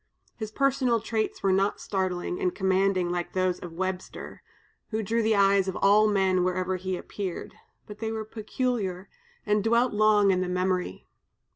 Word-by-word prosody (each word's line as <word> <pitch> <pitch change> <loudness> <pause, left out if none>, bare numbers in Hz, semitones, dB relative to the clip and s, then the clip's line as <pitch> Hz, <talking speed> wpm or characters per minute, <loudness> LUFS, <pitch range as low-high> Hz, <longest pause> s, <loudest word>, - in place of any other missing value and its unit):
His 215 -2 -5
personal 255 -1 +1
traits 220 0 -3
were 195 - +3
not 195 +2 +1
startling 190 - -2
and 365 -1 0
commanding 190 -2 +1
like 175 -1 -3
those 185 -1 0
of 175 -2 -9
Webster, 185 +1 -5 0.5
who 220 -1 -2
drew 230 +3 0
the 220 0 +2
eyes 195 -1 +4
of 190 - -2
all 210 +2 +5
men 190 -3 +2
wherever 185 0 -1
he 185 0 -3
appeared, 190 -2 -6 0.3
but 210 0 -11
they 220 0 -3
were 220 -1 -4
peculiar, 215 -4 -3 0.4
and 210 -1 +1
dwelt 235 +2 +2
long 210 -1 +4
in 185 -1 +1
the 185 - -2
memory. 180 - -1
195 Hz, 165 wpm, -27 LUFS, 185-220 Hz, 0.5 s, all